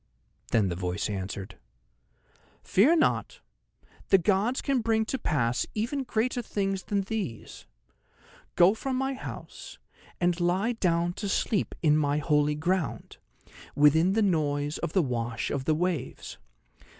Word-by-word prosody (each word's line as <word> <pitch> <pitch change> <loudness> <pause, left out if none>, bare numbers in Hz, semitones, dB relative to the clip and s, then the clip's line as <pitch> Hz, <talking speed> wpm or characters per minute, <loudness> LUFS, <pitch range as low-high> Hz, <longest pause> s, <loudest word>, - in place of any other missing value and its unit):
Then 105 -4 +2
the 85 - -3
voice 90 +3 -2
answered: 95 0 -6 1.0
"Fear 260 - +4
not! 320 - 0 0.7
the 195 - +6
gods 200 +7 +1
can 275 -3 0
bring 220 -1 +1
to 265 +4 -3
pass 125 - 0
even 235 +6 -1
greater 245 +2 -1
things 195 -4 -2
than 200 -1 0
these. 195 - -5 0.9
Go 180 +3 +6
from 260 +4 -3
my 265 +1 -1
house, 265 - -9 0.4
and 175 0 +1
lie 185 +6 +1
down 175 -6 0
to 200 +2 -4
sleep 200 +1 0
in 150 -1 +4
my 145 -1 +1
holy 150 0 +2
ground, 175 +2 -2 0.6
within 160 +5 +4
the 220 +1 +2
noise 150 -5 0
of - - -4
the 185 - +3
wash 120 -3 -3
of 135 -2 -2
the 155 - +2
waves. 165 -6 -3
175 Hz, 140 wpm, -28 LUFS, 145-215 Hz, 1.0 s, the